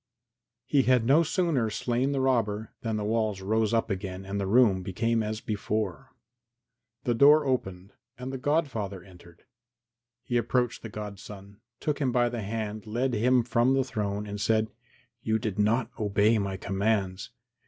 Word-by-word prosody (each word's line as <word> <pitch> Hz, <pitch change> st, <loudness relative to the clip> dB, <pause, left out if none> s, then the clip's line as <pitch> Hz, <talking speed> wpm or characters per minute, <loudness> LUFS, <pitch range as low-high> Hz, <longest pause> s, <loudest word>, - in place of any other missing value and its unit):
VI 120 Hz, 0 st, -61 dB
He 140 Hz, +1 st, +3 dB
had 125 Hz, -3 st, +4 dB
no 140 Hz, +7 st, +5 dB
sooner 160 Hz, -, +1 dB
slain 125 Hz, +5 st, -1 dB
the 135 Hz, -1 st, 0 dB
robber 110 Hz, -5 st, 0 dB
than 110 Hz, -2 st, -2 dB
the 105 Hz, -, -2 dB
walls 110 Hz, -2 st, 0 dB
rose 110 Hz, +2 st, +1 dB
up 115 Hz, -1 st, +1 dB
again 95 Hz, 0 st, -4 dB
and 100 Hz, +1 st, -3 dB
the 95 Hz, -, -2 dB
room 105 Hz, -3 st, +4 dB
became 115 Hz, +5 st, 0 dB
as 110 Hz, 0 st, -3 dB
before. 110 Hz, +3 st, -3 dB, 0.9 s
The 120 Hz, -, +1 dB
door 145 Hz, +5 st, +6 dB
opened 95 Hz, -8 st, -2 dB, 0.2 s
and 130 Hz, +2 st, -6 dB
the 135 Hz, -, -4 dB
godfather 125 Hz, -, -1 dB
entered. 85 Hz, -2 st, -17 dB, 0.8 s
He 120 Hz, -, -1 dB
approached 120 Hz, +1 st, 0 dB
the 115 Hz, -, -7 dB
godson, 100 Hz, 0 st, -9 dB, 0.2 s
took 150 Hz, -1 st, -2 dB
him 135 Hz, -4 st, +1 dB
by 120 Hz, 0 st, +2 dB
the 120 Hz, -1 st, -4 dB
hand, 110 Hz, 0 st, -4 dB
led 120 Hz, +4 st, -1 dB
him 120 Hz, +2 st, +3 dB
from 120 Hz, +2 st, +2 dB
the 135 Hz, -, +2 dB
throne 105 Hz, -4 st, -3 dB
and 100 Hz, 0 st, -6 dB
said, 110 Hz, -1 st, +1 dB, 0.5 s
"You 110 Hz, 0 st, +1 dB
did 105 Hz, -2 st, -4 dB
not 110 Hz, +5 st, +2 dB
obey 105 Hz, +1 st, +3 dB
my 100 Hz, -1 st, -2 dB
commands. 95 Hz, -1 st, -1 dB
110 Hz, 165 wpm, -28 LUFS, 100-125 Hz, 0.9 s, door